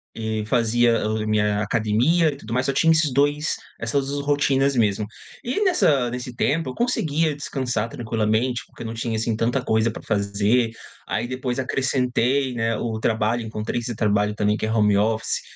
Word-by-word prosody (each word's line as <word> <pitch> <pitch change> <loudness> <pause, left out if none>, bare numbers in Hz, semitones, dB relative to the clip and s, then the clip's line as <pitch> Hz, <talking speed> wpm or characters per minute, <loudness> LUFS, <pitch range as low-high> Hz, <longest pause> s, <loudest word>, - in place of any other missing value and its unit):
e 110 -1 -3
fazia 115 -1 +2
o 110 0 -1
a - - -4
minha 105 -1 +1
academia 120 +10 +2
e 140 - -8
tudo 115 -3 -7
mais. 125 +1 +1
Só - - +2
tinha 165 +3 +4
esses 155 -3 +3
2 145 +2 +1 0.2
essas 135 +4 -1
rotinas 140 -1 +2
mesmo. 105 -2 +1 0.4
E 260 - -1
nessa 150 - +3
nesse 125 -1 -6
tempo, 150 +2 0
eu - - -7
conseguia 160 - 0
descansar 125 -6 -2
tranquilamente 115 -1 -1
porque - - -15
eu - - -5
não 115 - -5
tinha 115 0 -3
assim 110 0 -1
tanta 120 +4 0
coisa 110 -1 +1
pra - - -9
f - - -21
fazer. 105 +3 +1 0.4
Aí, 115 +2 -2
depois, 130 0 -3
acrescentei, 130 0 0
né, 115 -1 0
o 110 -2 -3
trabalho. 110 +1 0
Encontrei 110 +1 -3
esse 120 -1 -5
trabalho 105 -1 +1
também, 105 0 +1
que - - -2
é 110 - -2
home 105 -2 +3
office. 110 +2 0
120 Hz, 185 wpm, -23 LUFS, 110-135 Hz, 0.4 s, tinha